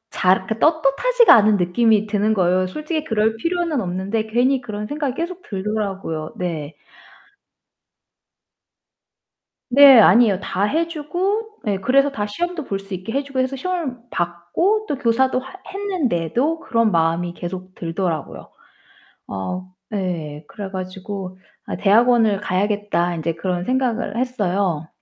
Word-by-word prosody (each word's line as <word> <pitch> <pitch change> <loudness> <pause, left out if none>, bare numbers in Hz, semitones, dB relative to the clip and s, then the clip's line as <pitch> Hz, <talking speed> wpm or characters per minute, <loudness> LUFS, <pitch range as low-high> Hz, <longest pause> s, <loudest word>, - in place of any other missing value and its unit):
잘 185 +1 +4
이렇게 215 +4 -5
떳떳하지가 325 - +4
않은 215 -1 +5
느낌이 210 +4 +2
드는 215 +1 +1
거예요. 185 -1 +2
솔직히 305 - -3
그럴 220 0 +1
필요는 335 +1 -1
없는데 195 +4 -2
괜히 250 +4 +2
그런 210 -3 -5
생각이 285 +1 -3
계속 345 +3 -4
들더라고요. 195 - -4
네. 160 -4 -4 2.9
네, 275 -1 +9
아니에요. 220 -3 +5
다 195 - -2
해 325 +10 0
주고 380 +8 -3
네 200 -3 -1
그래서 275 +7 +3
다 210 -6 -3
시험도 345 +7 -3
볼 195 -4 -3
수 195 0 -10
있게 185 +4 -5
해 280 +1 0
주고 275 -2 -4
해서 260 +1 0
시험을 320 -3 -3
봤고 175 - 0
또 290 - -1
교사도 255 +1 +2
하 265 +5 -11
했는데도 320 - -1
그런 230 -8 +1
마음이 165 +1 +1
계속 185 +1 -7
들더라고요. 170 -1 -4 0.8
어 180 - -5 0.2
네. 165 -7 -4
그래 200 -2 -7
가지고 185 0 -6 0.3
'아 - - -4
대학원을 220 +1 +4
가야겠다.' 195 -2 0
인제 165 +1 -2
그런 180 +1 -2
생각을 245 -3 -1
했어요. 195 -10 -1
215 Hz, 295 characters per minute, -21 LUFS, 185-275 Hz, 2.9 s, 네